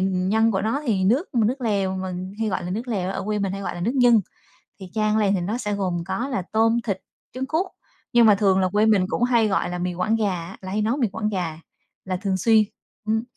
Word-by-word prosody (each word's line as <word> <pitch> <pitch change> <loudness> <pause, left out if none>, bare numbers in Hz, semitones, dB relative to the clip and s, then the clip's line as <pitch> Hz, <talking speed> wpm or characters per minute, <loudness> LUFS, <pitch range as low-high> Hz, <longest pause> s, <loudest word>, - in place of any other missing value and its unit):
nhân 190 +4 +2
của 190 -3 0
nó 225 +7 0
thì 195 -5 +1
nước 255 - +2
nước 240 +3 +1
lèo 200 -5 0
mình 185 0 -5
hay 220 - +1
gọi 190 - -2
là 180 - -4
nước 225 +7 -4
lèo, 190 -5 -1
ở 195 - -3
quê 210 +1 -1
mình 195 -2 -1
hay 195 - -5
gọi - - -3
là 175 - -6
nước 230 +9 -1
nhân. 245 -4 +5 0.6
Thì 190 - -8
chan 215 -1 +1
lên 200 -2 +2
thì 190 - 0
nó 205 +7 -2
sẽ 210 -4 -2
gồm 185 -4 -1
có 190 +8 -2
là 255 -8 -1
tôm, 225 +1 +3
thịt, 195 -4 -3 0.3
trứng 260 +1 -3
cút, 320 +7 0 0.5
nhưng 240 -1 +6
mà 210 -2 +7
thường 195 -2 +3
là 185 - +2
quê 210 +3 +2
mình 210 -4 +4
cũng 240 - -1
hay 235 -3 +3
gọi 195 -3 0
là 180 - -3
mì 180 0 -2
Quảng 185 +6 0
gà 215 -2 +1
á, 175 0 -5
là 190 -1 -7
hay 210 +2 0
nấu 225 +5 0
mì 250 -5 +2
quảng 215 +2 -3
gà 175 -6 -3 0.5
là 185 -1 -2
thường 195 0 -1
xuyên. 220 +3 +4 0.4
Ừm, 220 +1 +1
205 Hz, 260 wpm, -23 LUFS, 190-225 Hz, 0.6 s, mà